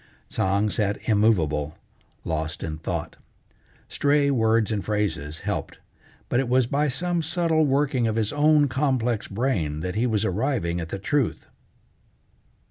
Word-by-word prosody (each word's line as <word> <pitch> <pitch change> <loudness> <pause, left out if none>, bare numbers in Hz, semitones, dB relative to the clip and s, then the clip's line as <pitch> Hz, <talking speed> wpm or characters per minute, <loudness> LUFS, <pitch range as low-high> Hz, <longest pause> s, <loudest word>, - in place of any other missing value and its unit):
Tsang 100 +2 +1
sat 105 -2 0
immovable, 80 -9 +2 0.5
lost 80 -1 -3
in 80 -1 -4
thought. - - -4 0.7
Stray 145 0 +2
words 110 -3 +2
and 105 -3 -1
phrases 100 -8 -2
helped, - - -4 0.5
but 120 - +1
it 135 -2 -1
was 130 0 +3
by 145 +5 0
some 170 +5 -1
subtle 160 -1 +1
working 135 -3 +1
of 110 - -1
his 110 +1 0
own 150 0 +4
complex 130 -5 0
brain 100 - -1
that 90 +1 -3
he 115 +4 +1
was 110 -2 0
arriving 95 -4 -1
at 80 - -6
the 95 - -4
truth. 130 +5 -1
110 Hz, 140 wpm, -25 LUFS, 95-140 Hz, 0.7 s, own